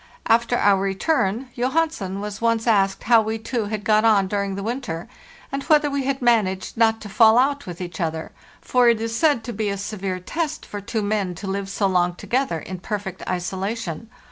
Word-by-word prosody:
After 235 +1 +3
our 200 -3 +4
return, 200 +3 0
Johansen 250 - -1
was 210 0 -6
once 230 -1 +1
asked 195 -4 +2
how 230 -1 +5
we 220 +1 -2
two 225 0 -3
had 210 0 -4
got 215 0 +3
on 210 -4 +4
during 200 0 -2
the 200 - -5
winter, 225 -7 -4 0.4
and 275 - -2
whether 300 -2 +4
we 280 -1 -1
had 270 -1 -1
managed 205 -6 +1
not 225 -1 +3
to 215 - -7
fall 220 +3 +5
out 280 +1 +2
with 175 -1 -7
each 180 0 -6
other; 160 -1 -3 0.3
for 250 -1 +3
it 230 -2 +2
is 225 0 -3
said 290 -4 +2
to 240 +1 -5
be 215 0 -1
a 200 - -2
severe 195 -2 -4
test 310 - -3
for 205 - -6
two 215 +2 -2
men 205 -3 -1
to 200 - -8
live 195 0 -3
so 200 - -1
long 180 -2 +2
together 250 -3 -1
in 185 +3 -7
perfect 190 -1 -5
isolation. 190 +2 -3
215 Hz, 200 wpm, -22 LUFS, 195-235 Hz, 0.4 s, how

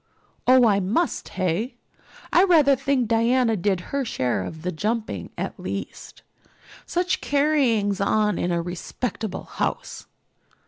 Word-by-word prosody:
"Oh, 255 -1 +7
I 205 -3 +4
must, 215 - -1
hey? 190 +7 -2 0.6
I 355 - +6
rather 305 -7 +5
think 260 -2 0
Diana 230 +1 +2
did 190 -1 0
her 280 -1 +1
share 125 - -1
of 160 - -8
the 180 - -1
jumping 220 +7 -3
at - - -4
least. - - -7 0.6
Such 360 +1 0
carryings 260 -9 +1
on 210 -1 +1
in 175 - 0
a 170 -1 0
respectable 195 +5 -4
house!" - - -4
225 Hz, 130 wpm, -24 LUFS, 190-270 Hz, 0.6 s, Oh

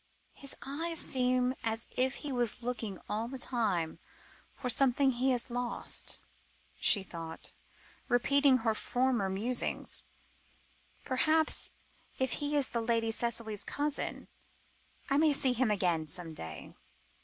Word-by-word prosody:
"His 275 -1 -6
eyes 325 +5 -3
seem 255 0 +2
as 225 0 -1
if 260 +1 +1
he 290 - -2
was 245 -2 -1
looking 230 -5 -3
all 220 +2 -1
the 265 +2 -6
time 205 -11 -1 0.6
for 255 - -4
something 265 +2 +4
he 255 +2 +1
has 250 0 0
lost," 245 0 -2 0.6
she 200 - +5
thought, 165 -3 -7 0.6
repeating 275 +2 +4
her 225 -2 +1
former 245 -2 0
musings; 225 +6 0 1.0
"perhaps, 310 +5 +2 0.5
if 260 -1 0
he 290 0 0
is 280 -4 +2
Lady 230 -1 +1
Cicely's 225 -2 -1
cousin, 290 0 -2 0.8
I 275 - +3
may 310 -1 +5
see 265 -2 +5
him 250 -1 +2
again 175 -6 +1
some 165 +1 -3
day. 80 - -8
245 Hz, 125 wpm, -32 LUFS, 220-265 Hz, 1.0 s, she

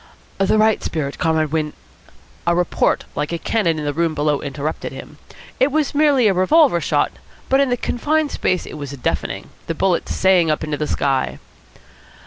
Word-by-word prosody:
"The 195 +2 +3
right 215 0 +3
spirit, 145 -4 -3
Comrade 160 -2 +1
Win 155 -1 -1 0.4
" - - -29
A 170 - +3
report 175 -1 +1
like 150 +2 -3
a 170 - -1
cannon 170 -3 0
in 150 - -4
the 145 - -1
room 165 +1 0
below 145 -1 0
interrupted 145 +2 -4
him. - - -11 0.4
It 270 +2 +3
was 300 -1 0
merely 285 -5 +4
a 200 - +3
revolver 185 - +4
shot, - - +1 0.4
but 270 - +4
in 275 -1 +3
the 245 - +1
confined 300 +6 0
space 185 -1 0
it 155 - -8
was 145 -2 -5
deafening. 135 - -3 0.2
The 165 - -2
bullet 185 +1 0
sang 185 -3 +3
up 155 - 0
into 150 -1 -2
the 150 - -2
sky. 135 -2 0
170 Hz, 185 wpm, -20 LUFS, 150-225 Hz, 0.4 s, merely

